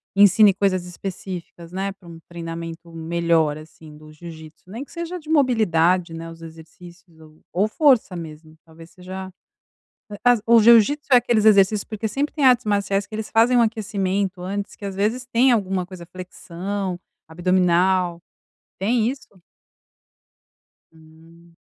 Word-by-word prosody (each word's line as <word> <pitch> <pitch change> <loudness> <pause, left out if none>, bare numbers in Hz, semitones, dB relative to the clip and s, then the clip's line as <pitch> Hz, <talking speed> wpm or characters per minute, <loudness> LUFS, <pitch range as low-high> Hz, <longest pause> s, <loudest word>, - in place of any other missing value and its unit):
ensine 205 0 +6
coisas 185 -2 0
específicas, 180 -2 -8
né, 195 +2 -3
para 190 -3 -20
um 165 -1 -11
treinamento 165 0 -8
melhor, 165 -2 0
assim, 155 0 -14
do 155 0 -15
jiu-jítsu, 160 +1 -13
nem 230 +7 -6
que - - -18
seja 340 +1 -5
de 310 -1 -15
mobilidade, 185 - +2
né, 165 0 -7
os 165 0 -13
exercícios 165 +1 -14
ou 155 0 -18
ou 200 +4 +1
força 255 - +2
mesmo, 155 -1 -10
talvez 165 0 -16
seja, 185 0 -9 0.8
hã, 205 - -7
as 245 -3 +4
o 235 0 +6
jiu-jítsu 235 +6 +5
é - - +9
aqueles 235 -3 +1
exercícios 200 -1 +4
porque 220 0 -4
sempre 285 +6 -2
tem 290 - -1
artes 250 -2 +4
marciais 200 -1 0
que - - -18
eles 220 0 -5
fazem 230 +3 +3
um 240 - +5
aquecimento 200 -4 -2
antes, 200 +2 -5
que - - -17
às 195 - -5
vezes 220 +6 -1
tem 245 +2 +3
alguma 190 -4 -1
coisa, 180 -2 -11
flexão, 185 +1 -6 0.3
abdominal, 180 0 +1 0.6
tem 225 +3 +1
isso? 270 - -9 1.7
Hum. 165 +1 -20
185 Hz, 150 wpm, -22 LUFS, 170-215 Hz, 1.7 s, é